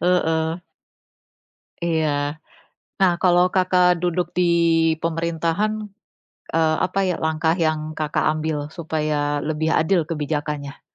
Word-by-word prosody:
Heeh. 170 -3 +2 1.4
Iya. 150 -3 0 0.6
Nah, 185 -2 +5
kalau 180 -1 +4
Kakak 180 -2 +3
duduk 175 0 -1
di 180 - +3 0.6
pemerintahan, 165 +4 -1 0.8
eee, 160 -1 +2
apa 185 +2 -2
ya 180 - 0
langkah 160 +1 +1
yang 155 -2 +1 0.2
Kakak 155 -1 -1
ambil, 155 -2 -3
supaya 150 -3 -1
lebih 155 +1 -1
adil 165 +1 +2
kebijakannya? 150 -2 -3
160 Hz, 105 wpm, -22 LUFS, 155-175 Hz, 1.4 s, Nah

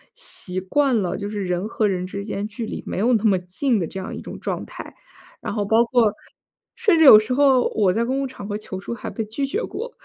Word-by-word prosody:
习 185 - -3
惯 275 +6 +1
了 180 - -2
就 205 0 -4
是 205 -2 -3
人 180 +3 -2
和 220 -1 -1
人 185 -2 -1
之 200 +1 -6
间 205 0 -4
距 220 +2 -6
离 - - -5
没 - - -4
有 230 +6 +2
那 220 0 +1
么 195 -3 +4
近 210 +8 -1
的 175 - -1
这 190 - -7
样 190 - -6
一 - - -7
种 - - -9
状 - - -4
态。 - - -10 0.5
然 - - -4
后 205 -2 -1
包 225 +3 +4
括 230 -3 +2 0.6
甚 440 -8 +3
至 320 - +5
有 215 -7 +11
时 215 +4 -2
候 270 -2 +4
我 200 -4 +3
在 230 +4 0
公 260 +2 -1
共 275 - -1
场 210 -6 -8
合 205 0 -3
求 190 -3 -7
助 215 - -6
还 - - -6
被 225 - -4
拒 250 +6 -3
绝 405 - -2
过， 480 +1 -5
215 Hz, 275 characters per minute, -22 LUFS, 195-255 Hz, 0.6 s, 有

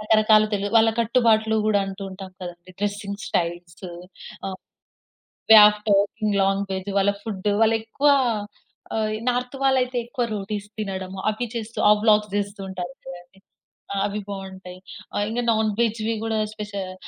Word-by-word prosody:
రకరకాలు 215 0 +4
తెలు 205 0 -1
వాళ్ళ 225 0 +5
కట్టుబాట్లు 220 -2 +3
కూడా 205 -2 +3
అంటూ 195 +1 -7
ఉంటాం 190 0 -9
కదండీ! 175 +1 -9
డ్రెసింగ్ 205 0 -3
స్టైల్స్ 175 0 -3 0.7
ఆహ్, 190 - -6 0.9
వే 220 - +11
ఆఫ్ 210 0 -3
టాకింగ్ 205 +1 +1
లాంగ్వేజ్, 195 0 -1
వాళ్ళ 200 +1 +3
ఫుడ్. 205 -2 -3
వాళ్ళు 225 0 +4
ఎక్కువ 275 +6 0 0.9
ఆహ్, 215 -1 0
ఇ - - -11
నార్త్ 250 +2 -3
వాళ్ళయితే 255 -2 +2
ఎక్కువ 245 0 -2
రోటిస్ 205 +1 -5
తినడం 190 -2 -4 0.2
అవి 230 +2 -4
చేస్తూ 225 0 -6
ఆ - - +9
వ్లాగ్స్ 210 -2 +3
చేస్తూ 200 0 -4
ఉంటారు 180 -1 -5 0.2
గదండీ. 175 +2 -12 0.7
అవి 210 +1 -3
బాగుంటాయి. 190 -2 -8 0.4
ఆహ్, 205 - 0
ఇంగ 240 +2 -1
నాన్‌వేజ్‌ 220 +1 0 0.2
కూడా 220 -1 -1
స్పెషల్‌గా 200 -3 -6
205 Hz, 140 wpm, -23 LUFS, 195-220 Hz, 0.9 s, వే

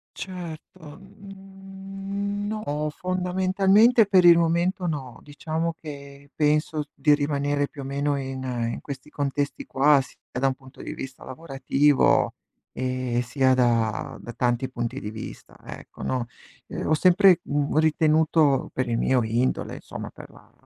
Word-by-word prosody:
Certo, 170 -3 -8
n 195 +1 -7
no, 150 -9 -2
fondamentalmente 190 +6 +3
per 185 -3 +5
il 170 -1 +9
momento 170 +3 +1
no. 135 -6 -5
Diciamo 160 +3 -3
che 140 -2 -10
penso 150 0 +1
di 150 -1 +3
rimanere 145 0 0
più 140 - -9
o - - -6
meno 140 +1 -1
in 130 -1 -5 0.3
in - - -5
questi 140 +1 -8
contesti 145 -1 -2
qua, 140 +1 +4
sia 130 - -13 0.2
da 135 - +2
un 130 - 0
punto 130 -1 -15
di - - -6
vista 135 0 -8
lavorativo 135 0 +2 0.4
e 130 -1 -1
sia 130 +1 +2
da 115 -4 +1
da 120 - -9
tanti 120 +1 0
punti 120 -2 -4
di 105 - -6
vista, 110 -1 -9
ecco, - - -11
no, 125 -2 -1 0.4
ehm, - - -5
ho 155 - +3
sempre, 185 +1 +5
mhmm, 145 +1 -1
ritenuto 155 -2 +3
per 130 -1 -2
il 115 - 0
mio 125 -1 +2
indole, 120 +3 -1
insomma - - -8
per - - -13
la - - -19
150 Hz, 145 wpm, -25 LUFS, 135-180 Hz, 0.4 s, il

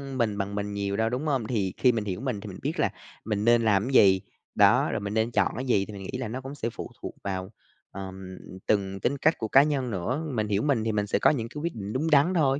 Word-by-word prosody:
mình 115 -5 0
bằng 100 0 -3
mình 105 0 -3
nhiều 100 0 -2
đâu, 110 0 +1
đúng 125 +6 -3
hông? 135 -7 0
Thì 100 -6 -1
khi 125 - +4
mình 110 -3 -2
hiểu 95 +2 -3
mình 125 -7 -3
thì - - -8
mình - - -8
biết - - -3
là - - +3 0.4
mình 105 -1 -1
nên 120 0 +5
làm 100 -3 +3
cái 135 - -3
gì, 95 -6 +6 0.3
đó, - - +5
rồi - - -1
mình 100 0 -4
nên 110 +2 +1
chọn - - +2
cái 130 - -4
gì 105 -6 +2
thì 105 - -10
mình 100 -1 -8
nghĩ 130 - -3
là 130 -2 -3
nó 125 +5 -5
cũng 135 +2 -8
sẽ 115 -5 -3
phụ - - -8
thuộc - - -6
vào, 95 0 -4 0.4
ờm, 95 -1 -8 0.3
từng 95 -2 0
tính 140 +8 0
cách 155 +4 +2
của 110 - -3
cá 135 +5 +6
nhân 140 -5 -1
nữa. 115 - -2
Mình 110 -3 0
hiểu 100 0 +1
mình 135 -7 +1
thì 110 - 0
mình 105 -1 -1
sẽ - - +1
có - - +5
những 120 -6 -1
cái 145 +4 -7
quyết 170 -2 -3
định 105 -1 -5
đúng 155 +5 0
đắn 150 +5 +5
thôi, 140 -5 +2
110 Hz, 285 wpm, -27 LUFS, 100-130 Hz, 0.4 s, gì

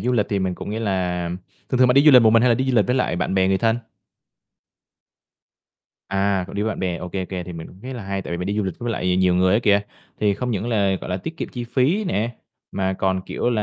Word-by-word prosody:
du 125 +5 0
lịch 110 -4 +2
thì 100 - 0
mình 95 -1 -1
cũng 100 - -7
nghĩa 110 +2 -3
là 90 -4 -1 0.4
thường 130 - 0
thường 130 0 +5
bạn 125 - +4
đi 140 - +6
du 155 - +9
lịch 125 -3 +8
một 110 - +6
mình 115 +1 +5
hay 125 - +4
là 120 - +5
đi 130 - -1
du 125 - +1
lịch 105 - +4
với 125 - +1
lại 125 -8 0
bạn 90 +1 -1
bè 95 -1 +3
người 95 0 +2
thân? 115 +1 +2 2.3
À, 100 0 0
cậu - - -10
đi 100 - -1
với 110 - 0
bạn - - -4
bè, 90 -2 -1
ô 90 - -6
kê, 95 +1 -3
ô - - -6
kê. 90 -2 -4
Thì 90 - -8
mình 80 -1 -7
cũng 95 - -16
thấy 130 +1 -6
là 120 - -6
hay 95 0 -3
tại - - -6
vì - - -1
mình 90 - -3
đi 100 +1 -2
du 105 - +1
lịch 95 - -3
với 120 -1 -2
lại 90 -3 0
nhiều 90 -1 +3
người 90 +1 +3
á 110 - +3
kìa, 100 -2 +4 0.4
thì 105 -1 +2
không 125 +4 -3
những 110 +1 -2
là, 100 -4 +2
gọi - - -7
là, 90 - 0
tiết 160 - -7
kiệm - - -4
chi 120 -1 -6
phí 140 - +1
nè, 120 - -2 0.4
mà 95 -1 -1
còn, 95 0 0
kiểu 120 - -1
là, 110 -3 0
100 Hz, 305 wpm, -22 LUFS, 95-120 Hz, 2.3 s, du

